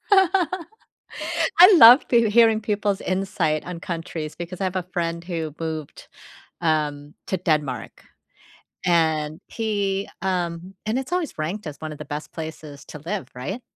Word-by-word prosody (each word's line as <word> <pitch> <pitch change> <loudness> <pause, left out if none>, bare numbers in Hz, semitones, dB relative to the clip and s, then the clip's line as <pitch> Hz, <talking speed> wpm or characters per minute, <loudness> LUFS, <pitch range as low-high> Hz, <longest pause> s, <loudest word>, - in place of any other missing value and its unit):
I 375 0 +2 0.9
love 245 -3 +9
peo 235 -3 +4
hearing 225 0 +5
people's 205 -2 -1
insight 185 -5 -1
on 175 -1 -6
countries, 165 -3 -5
because 175 +2 -7
I 190 - +1
have 185 - -3
a 185 - -1
friend 170 -1 -2
who 165 -4 -4
moved, 160 -2 -5 0.5
um, 150 -3 -1
to 190 - -1
Denmark, 150 - -2 0.8
and 160 -2 +1
he, 200 -3 -2
um 180 -1 -2
and 220 +3 0
it's 265 +6 -7
always 355 - -2
ranked 170 +4 -3
as 145 - -7
one 155 - -5
of 150 - -8
the - - -7
best 150 +1 -6
places 155 -3 -8
to 150 - -10
live, 170 -2 -4
right? 190 - -5
175 Hz, 150 wpm, -23 LUFS, 155-210 Hz, 0.9 s, love